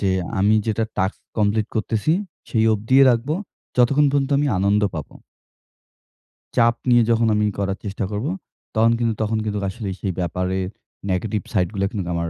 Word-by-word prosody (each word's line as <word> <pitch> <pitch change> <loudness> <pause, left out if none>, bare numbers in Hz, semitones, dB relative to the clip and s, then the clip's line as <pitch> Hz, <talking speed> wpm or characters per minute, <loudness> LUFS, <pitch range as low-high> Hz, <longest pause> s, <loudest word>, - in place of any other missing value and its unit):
যে 100 - +1 0.3
আমি 100 +3 +4
যেটা 110 0 0
টাস্ক 95 +2 0 0.2
কমপ্লিট 105 0 +2
করতেছি 110 +5 0 0.4
সেই 110 -2 +2
অবধিয়ে 115 +6 +4
রাখবো 120 +5 0 0.4
যতক্ষণ 140 +4 +4
পর্যন্ত 140 0 0
আমি 145 - +1
আনন্দ 100 +2 +2
পাবো। 80 -3 -6 1.4
চাপ 115 0 +4
নিয়ে 120 -1 +6
যখন 115 0 +3
আমি 105 0 +2
করার 100 -1 -1
চেষ্টা 100 0 -3
করবো 110 +10 -2 0.4
তখন 115 +1 +4
কিন্তু 115 -1 +1
তখন 110 +1 0
কিন্তু 105 -1 -2
আসলেই 100 -2 -5
সেই 95 - -1
ব্যাপারে 90 +2 -1 0.5
নেগেটিভ 95 +2 -1
সাইডগুলা 100 +1 0
কিন্তু 100 -6 -4
আমার 85 0 -2
105 Hz, 155 wpm, -22 LUFS, 95-115 Hz, 1.4 s, নিয়ে